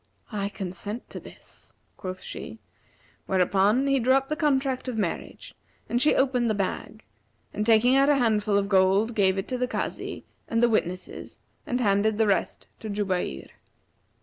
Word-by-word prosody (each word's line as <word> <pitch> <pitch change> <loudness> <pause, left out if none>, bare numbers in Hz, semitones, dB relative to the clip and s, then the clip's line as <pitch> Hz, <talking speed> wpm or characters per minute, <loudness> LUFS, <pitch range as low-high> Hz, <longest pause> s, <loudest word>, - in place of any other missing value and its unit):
'I 200 -2 -2
consent 205 +4 -6
to - - -6
this,' - - -11 0.2
quoth 185 0 -6
she, 110 - -7 0.7
whereupon 195 +6 +3
he 275 -1 +2
drew 255 +2 +3
up 270 0 0
the 305 - 0
contract 270 -4 0
of 250 -3 -3
marriage 200 -6 -4 0.3
and 240 - 0
she 300 - +4
opened 250 -3 +2
the 215 - +1
bag; 195 -2 -4 0.5
and, 210 +1 -2
taking 235 +3 +5
out 275 +1 +5
a 290 - +5
handful 215 -5 +2
of 200 0 +1
gold, 195 +3 +3
gave 195 -3 +2
it 195 - -3
to 255 - -2
the 250 - +1
Kazi - - -4 0.2
and 230 +1 +1
the 240 - +5
witnesses 185 -4 -3 0.3
and 250 -4 -1
handed 205 -1 +2
the 220 - +3
rest 200 -2 0
to 220 - -7
Jubayr. 185 - -2
215 Hz, 170 wpm, -26 LUFS, 195-250 Hz, 0.7 s, taking